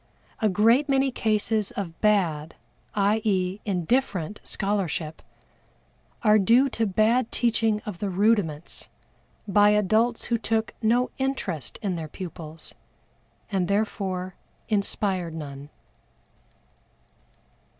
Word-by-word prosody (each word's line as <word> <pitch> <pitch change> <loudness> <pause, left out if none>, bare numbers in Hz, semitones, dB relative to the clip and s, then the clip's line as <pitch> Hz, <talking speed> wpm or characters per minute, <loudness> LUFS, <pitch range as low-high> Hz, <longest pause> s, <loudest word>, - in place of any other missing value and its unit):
A 215 - +3
great 230 +9 +4
many 270 0 +3
cases 215 -2 0
of 175 -5 -6
bad, 170 -8 +1 0.4
i. 210 +2 +2
e., 190 -2 0
indifferent 200 -1 0
scholarship, 180 -6 -2 1.0
are 215 -1 +6
due 235 +8 +4
to 225 -3 -1
bad 220 +5 +2
teaching 225 -3 +1
of 205 -5 -6
the 205 - -2
rudiments 185 -5 0 0.6
by 205 +1 +5
adults 215 +3 +2
who 235 -1 0
took 225 -1 -1
no 240 +3 +2
interest 200 - -2
in 190 -4 -1
their 160 -1 -5
pupils, 160 -1 -7 0.8
and 190 -3 +1
therefore 195 -3 -1 0.4
inspired 195 -5 -1
none. 145 -2 -7
205 Hz, 105 wpm, -26 LUFS, 180-225 Hz, 1.0 s, are